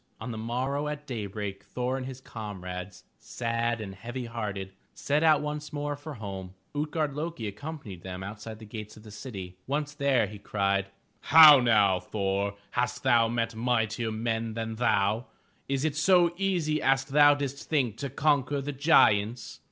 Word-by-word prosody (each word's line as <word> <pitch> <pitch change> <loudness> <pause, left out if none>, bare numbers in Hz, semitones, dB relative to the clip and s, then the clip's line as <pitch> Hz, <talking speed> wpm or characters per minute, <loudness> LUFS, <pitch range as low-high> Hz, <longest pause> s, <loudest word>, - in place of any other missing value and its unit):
On 120 +2 -5
the 110 - -5
morrow 130 +6 -2
at 150 0 -5
daybreak, 105 -5 -5
Thor 125 +4 -2
and 130 -1 -4
his 130 -1 -7
comrades, 95 -5 -7 0.2
sad 115 0 -2
and 100 -3 -6
heavy 120 +6 -6
hearted, 100 -5 -5 0.2
set 145 +2 0
out 155 -2 +5
once 150 0 -4
more 145 0 -3
for 145 +1 -8
home.' 95 -4 -7 0.2
Ut'gard 150 0 -1
lo'ki 155 -5 -4
accompanied 105 - -7
them 95 0 -6
outside 110 +2 -7
the 110 - -11
gates 105 0 -8
of 105 - -14
the 110 - -12
city. 100 -6 -8
Once 145 +2 -2
there, 140 -5 +2
he 105 0 -9
cried: 100 -1 0 0.3
"How 155 -3 +9
now, 105 -6 +4
Thor, 100 +1 -2 0.2
hast 125 0 -1
thou 115 -1 +4
met 115 0 -1
mightier 115 -1 0
men 115 0 -2
than 115 -1 -4
thou? 110 0 +1 0.4
Is 135 +1 0
it 155 -2 0
so 175 +2 +4
easy 175 -5 0
as 135 0 +2
thou 145 +1 +6
didst 140 -1 -5
think 130 -8 +1
to 140 - -4
conquer 145 0 +1
the 140 +1 -4
giants?" 120 -6 +3
120 Hz, 165 wpm, -28 LUFS, 105-145 Hz, 0.4 s, How